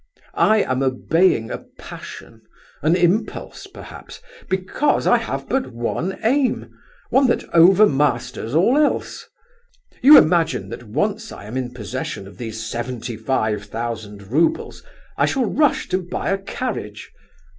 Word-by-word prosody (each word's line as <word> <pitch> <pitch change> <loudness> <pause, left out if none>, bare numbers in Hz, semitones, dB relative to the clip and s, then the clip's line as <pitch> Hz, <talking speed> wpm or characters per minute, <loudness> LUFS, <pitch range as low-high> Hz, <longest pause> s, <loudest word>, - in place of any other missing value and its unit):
I 215 -1 +3
am 130 +1 -1
obeying 135 0 +1
a - - -4 0.2
passion, - - -11 0.4
an 155 +4 +3
impulse 180 +4 -1
perhaps, - - -12 0.3
because 190 +10 0
I - - +5
have - - -5
but 265 -1 0
one 125 +10 -3
aim, 260 +4 +1 0.4
one 265 0 +4
that 240 - 0
overmasters 150 - +3
all 235 - +4
else. 300 - -1 0.7
You 290 +3 +10
imagine 160 - +3
that 115 - -7
once 210 - -2
I - - -10
am 110 +4 -8
in 130 -2 -3
possession 105 -4 -6
of 100 -2 -15
these 115 -1 -5
seventy 120 0 -5
five 110 -2 -1
thousand 110 -2 -6
roubles, 160 +5 0 0.4
I - - +4
shall 265 -2 0
rush 290 +7 +1
to 185 - +1
buy 180 +2 -3
a 195 - 0
carriage... 195 - -5
150 Hz, 135 wpm, -21 LUFS, -, 0.7 s, You